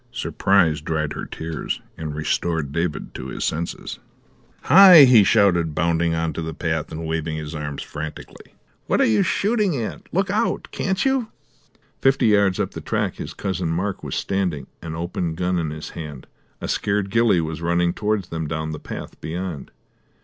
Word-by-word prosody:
Surprise 85 -6 +2
dried 75 -1 -2
her - - -6
tears 80 -1 -4 0.2
and 80 -2 -5
restored 80 -1 -1
David 85 0 -2
to 65 - -6
his - - -5
senses. 85 +2 -3 0.6
"Hi!" 185 -5 +10
he 125 -5 +7
shouted, 85 -6 +3
bounding 85 0 +1
on 80 0 -1
to - - -4
the 80 -1 -5
path, 80 -2 -2
and 80 +1 -5
waving 80 0 -2
his 75 0 -6
arms 75 -2 -4
frantically. 75 +1 -8 0.3
"What - - +2
are - - +5
you 110 -2 +3
shooting 205 - +1
at? 110 - -6
Look - - 0
out, - - 0
can't 190 +5 -1
you?" 265 -4 +1 0.7
Fifty 135 0 +3
yards 100 -3 +3
up - - -1
the - - -7
track - - -2
his - - -7
Cousin 95 -3 -2
Mark 95 +4 -2
was - - -4
standing, 95 -7 -1 0.2
an 80 -1 -6
open 85 0 -3
gun 90 +1 0
in 80 -2 -2
his 80 +1 -7
hand; 75 -5 -8 0.4
a - - -3
scared 100 -1 -1
ghillie 115 -4 +4
was 80 0 -3
running 85 +1 +1
towards 105 -3 -1
them 80 -2 -3
down 80 0 -3
the 75 - -5
path - - -8
beyond. 85 -2 -5
85 Hz, 175 wpm, -22 LUFS, 80-100 Hz, 0.7 s, Hi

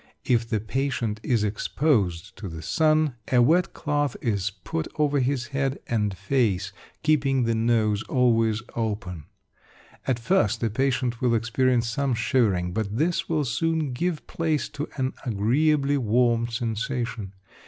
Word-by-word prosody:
If 115 -2 +1
the 110 - +1
patient 115 -1 -2
is 115 -3 +1
exposed 105 - 0
to 100 - -6
the 80 -1 -8
sun, 155 - +2
a 125 - +5
wet 165 +9 +3
cloth 145 -3 -1
is 100 -5 0
put 90 -4 -5
over 145 -1 +2
his 125 -2 -1
head 135 0 0
and 105 -4 -1
face, 100 -3 0 0.3
keeping 140 -4 +2
the 115 0 +1
nose 110 -2 +2
always 115 -3 +2
open. 100 -8 -3 0.8
At 130 -3 +2
first 115 -2 +1
the 115 -2 -1
patient 125 -1 0
will 120 -2 +3
experience 120 +1 +1
some 130 +2 0
shivering, 105 -6 +1
but 105 +1 -2
this 165 +5 0
will 155 -3 +1
soon 155 +4 0
give 165 +4 -2
place 155 -7 -1
to 145 +1 -5
an 130 -1 -1
agreeably 140 +6 +2
warm 120 0 +2
sensation. 115 -3 -3
120 Hz, 145 wpm, -25 LUFS, 110-140 Hz, 0.8 s, a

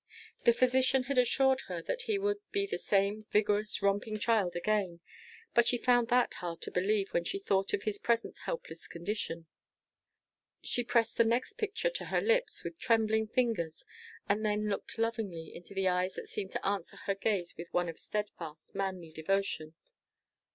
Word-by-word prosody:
The 235 - +8
physician 255 +1 +3
had 270 0 +1
assured 265 +2 +4
her 180 -2 -3
that - - -2
he 425 - +3
would 410 +1 0
be 400 0 +1
the 400 - -3
same 200 +1 +1
vigorous, 210 -1 +1
romping 205 +2 +1
child 210 -5 +2
again; 185 -1 0 0.5
but 235 -1 +5
she 245 - +4
found 245 -1 +3
that 245 0 +3
hard 170 -2 -5
to - - -2
believe 195 +2 +1
when 170 - +2
she 390 - -2
thought 195 - +1
of 200 - 0
his 210 -2 -2
present 230 -1 0
helpless - - -5
condition. 170 -2 -3 1.2
She 245 - +1
pressed 230 -1 +1
the 230 - +6
next 245 - 0
picture 435 +3 0
to - - -3
her - - +1
lips 485 +2 +2
with 330 - -6
trembling 220 -2 +2
fingers, 220 -10 -1 0.4
and 210 +1 +1
then 210 0 +1
looked 200 - -4
lovingly 220 -8 -2
into 175 +3 -11
the 190 0 +1
eyes 180 +1 +1
that - - -6
seemed 195 -2 -4
to - - -3
answer 200 -3 -2
her 200 - -1
gaze 195 -3 -1
with 170 +1 -8
one 175 0 +1
of 165 - -6
steadfast, 170 -7 -5
manly 190 -4 -3
devotion. 160 -1 -1
210 Hz, 175 wpm, -32 LUFS, 190-245 Hz, 1.2 s, The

